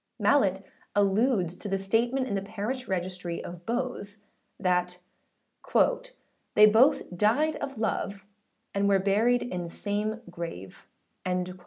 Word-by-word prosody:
Mallet 195 -9 +3 0.3
alludes 200 -2 +2
to 210 - -7
the 195 -1 0
statement 235 +7 +1
in 205 - -3
the 195 - 0
parish 220 +5 -4
registry 180 -2 -3
of 175 0 -9
Bowes, 235 -4 -3 0.4
that 180 -1 +1 0.7
âthey - - +2
both 225 -5 +4
died 240 - +2
of 275 -3 -5
love, 200 -3 -2 0.5
and 200 0 +1
were 195 - +5
buried 215 +6 +2
in 180 -7 -4
the 170 - -6
same 210 +4 -3
grave,â 175 - -6
&c. - - -7
200 Hz, 130 wpm, -28 LUFS, 185-235 Hz, 0.7 s, were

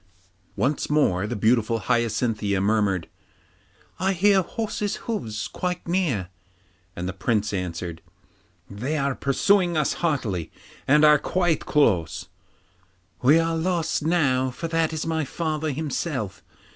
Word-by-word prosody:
Once 140 +3 0
more 105 -11 +2
the 120 - -3
beautiful 115 +1 +2
Hyacinthia 115 -4 0
murmured, 100 -3 +1 0.9
'I 190 +1 +1
hear 195 +2 +4
horses' 210 +2 -3
hoofs 115 - -3
quite 180 -1 -4
near.' 155 - 0 0.7
And 90 +1 -4
the 95 - -3
Prince 105 +1 0
answered, 90 -3 -4 0.7
'They 125 +10 -3
are 140 -1 0
pursuing 175 +6 +2
us 150 - +1
hotly 115 - -1 0.4
and 150 +2 +6
are 150 -1 +7
quite 175 -2 0
close.' 90 - +1 0.9
'We 145 +6 +6
are 165 0 0
lost 165 -1 0
now, 145 -6 +2
for 145 +7 -5
that 165 -1 +1
is 160 -1 -3
my 160 -1 0
father 155 +1 -2
himself. 140 - -3
140 Hz, 125 wpm, -24 LUFS, 105-165 Hz, 0.9 s, are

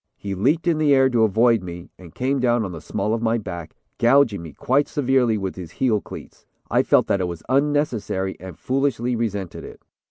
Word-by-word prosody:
He 100 -1 -5
leaped 140 - +1
in 165 -3 +1
the 145 -2 +4
air 135 0 +4
to 120 -2 +2
avoid 115 +1 +3
me, 85 -1 -9
and 90 -3 -15
came 135 +2 0
down 120 -3 +2
on 95 - -5
the 80 -3 -8
small 105 - -2
of 115 - -1
my 115 0 +1
back, 85 -7 -7 0.2
gouging 120 -5 +4
me 80 -2 -9
quite 135 - +1
severely 130 -6 +1
with 95 -2 -4
his 85 -3 -8
heel 115 -6 +1
cleats. - - -12 0.2
I - - +4
felt - - +3
that 100 - 0
it 90 - 0
was 85 -2 -7
unnecessary 130 -9 0
and 90 -3 -10
foolishly 130 -2 -1
resented 105 -6 -3
it." - - -11
115 Hz, 210 wpm, -22 LUFS, 95-130 Hz, 0.2 s, the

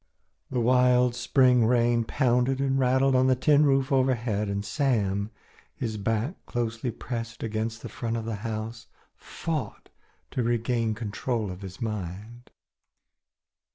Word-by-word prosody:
The 125 - -1
wild 125 0 +4
spring 125 -1 +3
rain 120 -1 +2
pounded 125 +1 +1
and 135 0 +1
rattled 130 +1 +3
on 130 0 +4
the 130 - +4
tin 145 +3 +4
roof 135 0 +2
overhead, 120 -6 +1
and 100 +1 -2
Sam, 105 -8 0 0.5
his 110 -3 -3
back 115 - -2
closely 120 0 -2
pressed 115 0 -6
against 110 0 -3
the - - -4
front 115 -1 -3
of 115 - -4
the 115 -2 -3
house, 110 +1 -5 0.3
fought 160 -4 -5 0.4
to 125 - -1
regain 115 -1 0
control 110 0 -3
of 90 +2 -9
his 95 -1 -9
mind. 105 +2 -6
120 Hz, 135 wpm, -27 LUFS, 110-130 Hz, 0.5 s, wild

